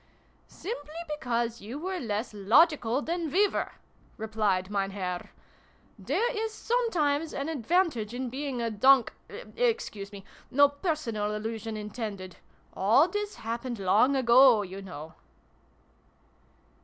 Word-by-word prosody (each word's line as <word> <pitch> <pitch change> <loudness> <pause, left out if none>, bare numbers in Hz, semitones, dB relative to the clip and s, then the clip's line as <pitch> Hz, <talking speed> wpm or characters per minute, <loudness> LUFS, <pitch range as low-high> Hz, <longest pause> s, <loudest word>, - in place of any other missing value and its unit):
" - - -36
Simply 310 -7 -7
because 240 -6 -2
you 230 +7 -7
were 370 +4 -3
less 220 -2 -3
logical 245 - +3
than 335 -1 -2
we 395 +8 +4
were," - - -3 0.4
replied 210 -4 -1
Mein 195 -1 0
Herr 185 -3 -4 0.7
".There 295 - 0
is 440 +1 -2
sometimes 345 -11 0
an 275 +2 -3
advantage 315 - 0
in 250 0 -4
being 265 -2 -3
a 230 - -1
donk 260 +4 +5 0.4
Excuse 455 - -1
me! 200 -1 -10 0.2
No 285 +2 +5
personal 275 - -2
allusion 220 0 -4
intended. 210 -3 -6 0.4
All 225 - +4
this 415 +2 -3
happened 235 +2 -4
long 210 +8 +3
ago, 250 -3 +6
you 190 +1 -8
know 160 -5 -9
240 Hz, 125 wpm, -28 LUFS, 210-305 Hz, 0.7 s, ago